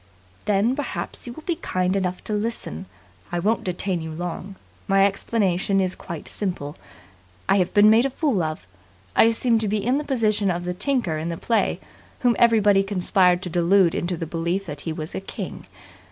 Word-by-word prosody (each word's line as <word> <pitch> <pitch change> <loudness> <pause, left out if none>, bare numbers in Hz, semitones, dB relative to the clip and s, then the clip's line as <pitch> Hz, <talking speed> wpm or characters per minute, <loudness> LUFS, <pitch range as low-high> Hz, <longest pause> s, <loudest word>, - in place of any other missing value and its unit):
"Then, 210 +4 +2
perhaps, 290 -3 -4
you 240 - -5
will 315 - -11
be 345 -1 -1
kind 185 +1 -1
enough 180 -2 -2
to 215 - -4
listen. 210 - -3 0.4
I 175 - -1
won't 210 +6 +1
detain 180 -1 -2
you 160 - -5
long. 175 +4 -5 0.3
My 195 0 +5
explanation 195 -1 +1
is 185 -1 +1
quite 170 -3 -8
simple. 170 -7 -4 0.7
I 195 - +4
have 180 -2 +1
been 205 +1 +7
made 230 +4 +5
a - - -5
fool 265 - 0
of. 155 - -3 0.5
I 225 - +6
seem 230 0 +2
to 220 - -1
be 210 +2 +1
in 255 +4 +2
the - - -3
position 215 -7 +1
of 175 -1 -1
the 180 - -2
tinker 190 - 0
in 160 +2 -3
the 170 - -3
play 230 +5 0 0.4
whom 245 -2 +3
everybody 210 -4 +5
conspired 185 -2 +2
to 180 - -4
delude 175 +1 +4
into 175 0 -2
the 165 - -3
belief 170 +4 -2
that 145 -2 -6
he - - -1
was 155 +1 -5
a - - -3
king. 195 - -7
195 Hz, 195 wpm, -23 LUFS, 175-220 Hz, 0.7 s, been